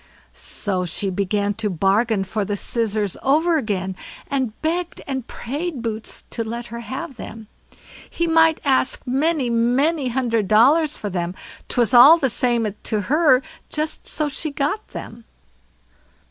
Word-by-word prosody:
So 190 Hz, -3 st, -3 dB
she 185 Hz, +3 st, -2 dB
began 200 Hz, +2 st, 0 dB
to 210 Hz, -, 0 dB
bargain 195 Hz, +4 st, +1 dB
for 205 Hz, +3 st, -2 dB
the 205 Hz, +1 st, -2 dB
scissors 215 Hz, -4 st, -1 dB
over 320 Hz, +5 st, +3 dB
again, 190 Hz, -6 st, -3 dB, 0.3 s
and 260 Hz, -6 st, -2 dB
begged 340 Hz, +2 st, -2 dB
and 265 Hz, -3 st, -4 dB
prayed 285 Hz, +1 st, -5 dB
Boots 220 Hz, -1 st, -4 dB
to 230 Hz, -, -2 dB
let 235 Hz, +2 st, -5 dB
her 235 Hz, -, -5 dB
have 260 Hz, +5 st, -6 dB
them; 220 Hz, -1 st, -9 dB, 0.6 s
he 340 Hz, -, -1 dB
might 325 Hz, -1 st, +4 dB
ask 265 Hz, -1 st, +1 dB
many, 275 Hz, +2 st, +1 dB
many 260 Hz, +6 st, +2 dB
hundred 235 Hz, -4 st, 0 dB
dollars 285 Hz, -, +4 dB
for 205 Hz, -, -5 dB
them, 175 Hz, 0 st, -3 dB, 0.3 s
'twas 240 Hz, 0 st, +2 dB
all 275 Hz, +7 st, +9 dB
the 270 Hz, -7 st, 0 dB
same 240 Hz, -1 st, +2 dB, 0.2 s
to 215 Hz, -2 st, -2 dB
her, 270 Hz, -, +3 dB, 0.3 s
so 305 Hz, 0 st, -2 dB
she 300 Hz, +2 st, -3 dB
got 295 Hz, +9 st, -2 dB
them. 230 Hz, +1 st, -9 dB
240 Hz, 145 wpm, -21 LUFS, 215-295 Hz, 0.6 s, all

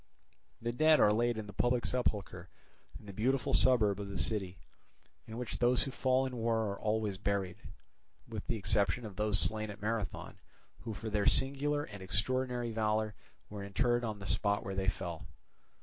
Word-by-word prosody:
The 120 Hz, -, 0 dB
dead 155 Hz, +5 st, +4 dB
are 105 Hz, -, +5 dB
laid 120 Hz, +1 st, +1 dB
in 110 Hz, -, -4 dB
the 100 Hz, -, -10 dB
public 120 Hz, +4 st, +1 dB
sepulchre 100 Hz, -7 st, -1 dB, 0.5 s
in -, -, -17 dB
the 100 Hz, -, -9 dB
Beautiful 125 Hz, +6 st, 0 dB
suburb 105 Hz, -6 st, +4 dB
of 100 Hz, -1 st, -5 dB
the 100 Hz, -, -5 dB
city, 95 Hz, -4 st, -1 dB, 0.7 s
in 110 Hz, 0 st, -7 dB
which 125 Hz, -1 st, -5 dB
those 125 Hz, +1 st, +4 dB
who 135 Hz, -, -4 dB
fall 130 Hz, 0 st, +1 dB
in 130 Hz, -2 st, -5 dB
war 115 Hz, -2 st, 0 dB
are 100 Hz, -, -6 dB
always 105 Hz, -3 st, -1 dB
buried; 100 Hz, -3 st, -1 dB, 0.7 s
with 110 Hz, -3 st, -7 dB
the 120 Hz, -, -1 dB
exception 105 Hz, +3 st, 0 dB
of 105 Hz, -3 st, -8 dB
those 105 Hz, -1 st, +2 dB
slain 110 Hz, 0 st, +2 dB
at 105 Hz, 0 st, -8 dB
Marathon, 110 Hz, -1 st, -4 dB, 0.4 s
who 110 Hz, 0 st, -6 dB
for 110 Hz, +3 st, -6 dB
their 105 Hz, -1 st, +1 dB
singular 145 Hz, +2 st, +2 dB
and 100 Hz, -7 st, -10 dB
extraordinary 120 Hz, +5 st, 0 dB
valour 110 Hz, -1 st, 0 dB, 0.3 s
were 105 Hz, 0 st, -7 dB
interred 120 Hz, +5 st, 0 dB
on 110 Hz, -3 st, -3 dB
the 95 Hz, -, -9 dB
spot 100 Hz, +1 st, +1 dB
where 95 Hz, -, -4 dB
they 95 Hz, 0 st, 0 dB
fell. 90 Hz, -2 st, -5 dB
110 Hz, 180 wpm, -33 LUFS, 100-120 Hz, 0.7 s, are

